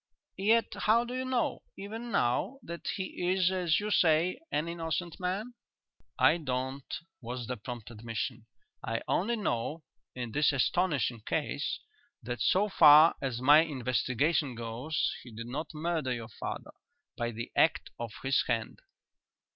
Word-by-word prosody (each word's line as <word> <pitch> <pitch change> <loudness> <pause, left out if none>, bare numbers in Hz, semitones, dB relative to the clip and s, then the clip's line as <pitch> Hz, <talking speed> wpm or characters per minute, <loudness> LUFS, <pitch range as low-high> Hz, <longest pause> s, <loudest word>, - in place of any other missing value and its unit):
"Yet 225 +4 +3
how 225 +2 +3
do 245 - -6
you 255 0 -2
know, 255 -2 0 0.2
even 225 +4 -6
now, 200 - +1
that 170 0 -7
he 185 -2 -2
is, 185 -1 +3
as 180 -4 +2
you 210 0 -3
say, 170 -1 +3
an 150 +3 0
innocent 170 0 -3
man?" 195 +6 -2 0.6
"I - - +5
don't," 130 -1 -3 0.3
was 120 0 -5
the 125 +2 -3
prompt 120 -1 -8
admission. 115 +1 -5 0.4
"I 115 0 -2
only 225 +7 +1
know, 155 - -2 0.3
in 120 -2 -4
this 145 +4 +3
astonishing 135 -5 +1
case, - - -1 0.4
that 120 +1 -4
so 195 +3 +3
far 155 -4 +8
as 130 -3 -2
my 145 +4 +8
investigation 135 0 0
goes, 120 +7 -2
he 125 - -12
did 115 +1 -7
not 145 +6 -5
murder 155 -4 -1
your 115 -2 -4
father - - -6 0.4
by 120 0 -2
the 115 0 -6
act - - +2
of 120 -2 -4
his 135 0 +3
hand." 115 -2 -2
150 Hz, 145 wpm, -30 LUFS, 120-180 Hz, 0.6 s, far